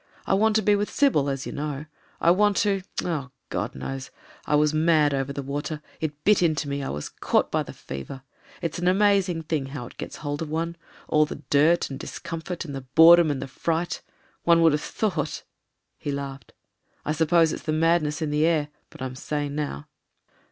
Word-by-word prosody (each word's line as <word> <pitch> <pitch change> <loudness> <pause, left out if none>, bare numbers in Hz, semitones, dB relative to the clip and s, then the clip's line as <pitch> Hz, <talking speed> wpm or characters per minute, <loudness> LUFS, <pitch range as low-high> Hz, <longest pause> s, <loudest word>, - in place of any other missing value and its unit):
I - - +1
want 215 +2 +3
to 220 - +3
be 205 +1 +4
with 205 +1 -1
Sybil, 250 - +2
as 135 -1 -3
you - - -5
know; 150 0 -4 0.3
I 170 - +5
want 205 +2 +3
to— 200 -2 +2 0.2
oh! 150 -6 -2 0.2
God - - -3
knows! 135 - -5 0.4
I 150 - +3
was 150 0 +3
mad 155 -2 +3
over 135 0 -1
the 140 0 -4
water 145 +3 -4
— - - -28
it 150 -2 -4
bit 210 -2 +4
into 155 -4 +1
me; 140 0 -2
I 135 - -3
was 75 - -4
caught - - 0
by - - +1
the - - -6
fever. 95 - -8 0.4
It's 170 0 -2
an 175 - 0
amazing 190 -3 +3
thing 150 -4 -2
how 135 -3 -6
it - - -13
gets - - -6
hold 145 +1 -2
of 160 - -3
one. 165 +2 -2 0.3
All 155 0 +3
the 150 - -8
dirt 155 +3 +4
and 135 - -6
discomfort, 165 +2 -5
and 145 - -6
the 135 - -4
boredom 165 +5 +7
and 140 -2 -2
the - - -6
fright 165 +5 -2 0.2
— - - -36
one 170 -1 +5
would 165 - +6
have 150 +1 0
thought.. 160 -8 -2 0.3
." - - -53
He 145 - -3
laughed. 140 -1 -6 0.5
"I - - 0
suppose 160 +1 +3
it's - - -5
the 155 - -2
mad 165 +2 +3
ness 150 +2 -2
in 150 - -2
the 150 +1 +2
air. 160 -3 +2 0.2
But - - -9
I'm 130 -1 -4
sane 145 +1 -3
now." 145 - -3
155 Hz, 215 wpm, -25 LUFS, 140-170 Hz, 0.5 s, boredom